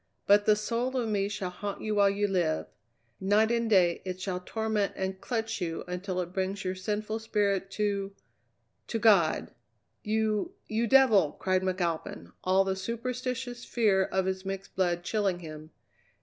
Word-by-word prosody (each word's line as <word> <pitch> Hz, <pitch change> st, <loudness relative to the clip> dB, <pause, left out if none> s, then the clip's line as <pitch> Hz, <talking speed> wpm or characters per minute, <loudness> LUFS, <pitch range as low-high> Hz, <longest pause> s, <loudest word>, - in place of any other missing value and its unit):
But 205 Hz, +1 st, +5 dB
the 215 Hz, -, +6 dB
soul 235 Hz, +5 st, -1 dB
of 240 Hz, -3 st, 0 dB
me 200 Hz, -1 st, 0 dB
shall 195 Hz, -3 st, -4 dB
haunt 200 Hz, +2 st, -5 dB
you 215 Hz, -, -1 dB
while 200 Hz, -1 st, +5 dB
you 205 Hz, +1 st, 0 dB
live. 175 Hz, -5 st, 0 dB, 0.5 s
Night 210 Hz, +4 st, +3 dB
and 235 Hz, -1 st, +1 dB
day 180 Hz, -5 st, +4 dB
it 185 Hz, -1 st, -5 dB
shall 185 Hz, -1 st, -2 dB
torment 220 Hz, -1 st, -1 dB
and 190 Hz, 0 st, -3 dB
clutch 225 Hz, -3 st, -2 dB
you 165 Hz, -2 st, -3 dB
until 180 Hz, +1 st, -3 dB
it 175 Hz, 0 st, -6 dB
brings 190 Hz, +1 st, -2 dB
your 185 Hz, -, 0 dB
sinful 210 Hz, +3 st, -3 dB
spirit 200 Hz, -3 st, 0 dB
to 200 Hz, -2 st, -1 dB, 0.7 s
to 230 Hz, -, -2 dB
God!" 200 Hz, -8 st, +4 dB, 0.5 s
"You 220 Hz, -, 0 dB
you 225 Hz, +2 st, 0 dB
devil!" 225 Hz, -, +5 dB
cried 185 Hz, -1 st, 0 dB
McAlpin, 170 Hz, -, -2 dB
all 190 Hz, +1 st, +4 dB
the 190 Hz, 0 st, -1 dB
superstitious 245 Hz, +3 st, -4 dB
fear 200 Hz, -5 st, +2 dB
of 190 Hz, 0 st, 0 dB
his 190 Hz, 0 st, -2 dB
mixed 195 Hz, 0 st, -6 dB
blood 175 Hz, -2 st, +1 dB
chilling 195 Hz, -1 st, 0 dB
him. 155 Hz, -1 st, -9 dB
200 Hz, 165 wpm, -29 LUFS, 185-220 Hz, 0.7 s, the